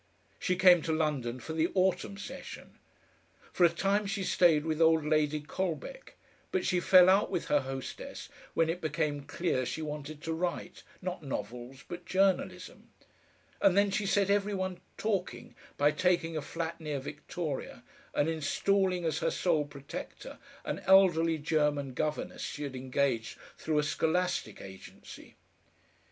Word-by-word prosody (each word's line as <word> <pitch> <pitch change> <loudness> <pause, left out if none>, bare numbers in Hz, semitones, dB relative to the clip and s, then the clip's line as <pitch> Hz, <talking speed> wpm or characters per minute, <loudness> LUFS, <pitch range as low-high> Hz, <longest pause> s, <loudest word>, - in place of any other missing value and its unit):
She 180 - 0
came 180 -2 +7
to 160 - -2
London 145 -6 -1
for 160 +6 -6
the 160 +2 +1
autumn 190 +1 +1
session. 205 - -9 0.7
For 180 - +2
a - - +6
time 195 +4 0
she 200 0 -2
stayed 165 -5 +3
with 160 0 -1
old 160 -1 +4
Lady 155 0 +2
Colbeck, 190 - -5 0.4
but 185 - 0
she 180 - +2
fell 180 0 +7
out 195 +2 +4
with - - -3
her 145 - +4
hostess 135 -1 -6 0.3
when 165 - +3
it 170 +3 -2
became 155 -2 -1
clear 145 -1 -1
she 160 +5 -4
wanted 150 0 -6
to 160 - -2
write, 175 +1 -3 0.2
not 180 -1 -4
novels, 130 -1 -6
but 175 0 -8
journalism, 190 0 0 0.7
and 190 - +4
then 200 0 +4
she 200 0 -1
set 200 0 +2
every 205 0 +1
one 185 -1 -3 0.2
talking 200 -4 -2 0.2
by 145 +1 +4
taking 170 -1 +1
a 155 - -1
flat 165 +2 -5
near 150 -2 -3
Victoria 150 +1 -5 0.3
and 145 - +2
installing 180 +4 +1
as 160 -1 0
her - - +1
sole 160 -5 +1
protector 140 -1 -9 0.3
an - - -3
elderly 175 -4 +5
German 150 -3 0
governess 150 +3 -3
she 150 - -4
had 140 -2 -5
engaged 130 -2 -1 0.2
through 155 -1 -2
a 150 - +3
scholastic 160 +5 -1
agency. 95 -1 -12
160 Hz, 150 wpm, -30 LUFS, 150-185 Hz, 0.7 s, came